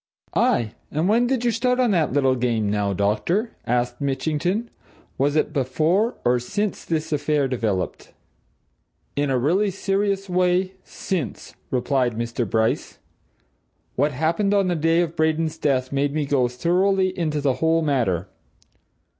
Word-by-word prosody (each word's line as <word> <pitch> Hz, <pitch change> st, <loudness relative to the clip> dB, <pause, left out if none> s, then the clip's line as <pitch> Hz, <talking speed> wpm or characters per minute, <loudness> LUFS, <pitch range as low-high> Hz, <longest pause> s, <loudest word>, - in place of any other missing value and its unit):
"Aye 115 Hz, -3 st, +2 dB, 0.2 s
and 155 Hz, +4 st, 0 dB
when 235 Hz, +4 st, +3 dB
did 250 Hz, -2 st, 0 dB
you 240 Hz, -, +3 dB
start 250 Hz, +2 st, +1 dB
on 245 Hz, -3 st, +3 dB
that 170 Hz, -5 st, +2 dB
little 135 Hz, -1 st, +3 dB
game, 115 Hz, -4 st, 0 dB
now, 105 Hz, -1 st, 0 dB
doctor?" 110 Hz, -, 0 dB, 0.2 s
asked 120 Hz, +1 st, 0 dB
Mitchington. 155 Hz, -, -1 dB, 0.5 s
"Was 140 Hz, +2 st, +2 dB
it 155 Hz, -, +1 dB
before, 155 Hz, -, +1 dB
or 120 Hz, 0 st, +3 dB
since, 205 Hz, -, -3 dB
this 160 Hz, -1 st, -2 dB
affair 150 Hz, -1 st, +1 dB
developed?" 110 Hz, -8 st, -2 dB, 1.0 s
"In 145 Hz, 0 st, 0 dB
a 130 Hz, -, +2 dB
really 180 Hz, +11 st, +2 dB
serious 195 Hz, +1 st, -1 dB
way 180 Hz, +1 st, +1 dB
since," 165 Hz, -, -4 dB, 0.2 s
replied 125 Hz, -2 st, 0 dB, 0.3 s
Bryce. 110 Hz, +1 st, 0 dB, 1.0 s
"What 145 Hz, +3 st, +2 dB
happened 165 Hz, +9 st, +1 dB
on 195 Hz, -2 st, +2 dB
the 175 Hz, -, +1 dB
day 165 Hz, +2 st, +2 dB
of 170 Hz, -1 st, -2 dB
Braden's 160 Hz, 0 st, 0 dB
death 130 Hz, -4 st, 0 dB
made 140 Hz, +1 st, 0 dB
me 150 Hz, -2 st, 0 dB
go 135 Hz, -3 st, +2 dB
thoroughly 185 Hz, +8 st, +1 dB
into 155 Hz, -4 st, -1 dB
the 140 Hz, -2 st, +1 dB
whole 165 Hz, 0 st, +3 dB
matter. 115 Hz, -, 0 dB
155 Hz, 145 wpm, -23 LUFS, 130-185 Hz, 1.0 s, when